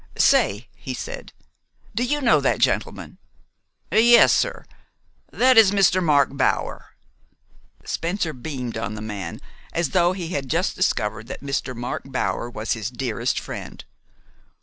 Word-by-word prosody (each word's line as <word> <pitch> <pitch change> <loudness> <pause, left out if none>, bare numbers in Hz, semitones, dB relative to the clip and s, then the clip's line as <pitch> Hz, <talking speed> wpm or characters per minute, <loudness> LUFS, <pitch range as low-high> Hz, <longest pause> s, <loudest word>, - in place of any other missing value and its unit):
"Say," 105 +3 +3
he 130 - -6
said, - - -7 0.6
"do 235 - 0
you 295 +4 0
know 240 - +4
that - - +1
gentleman?" - - -1 0.7
"Yes, 235 +2 +6
sir. - - -1 0.7
That 255 -1 +5
is 215 -3 +7
Mr. 190 -2 +3
Mark 140 -4 +3
Bower." 135 - -1 0.9
Spencer 170 -1 -2
beamed 125 -3 -5
on 110 -1 -4
the 105 - -7
man 100 -6 -6 0.3
as 170 -4 0
though 175 0 +3
he 180 -3 -5
had 140 -7 -3
just 170 +6 0
discovered 110 - -1
that - - -7
Mr. 135 -2 -3
Mark 120 +1 -4
Bower 130 -2 -2
was 110 -2 -5
his 110 -2 -4
dearest 125 -2 -2
friend. - - -8
140 Hz, 140 wpm, -23 LUFS, 120-185 Hz, 0.9 s, is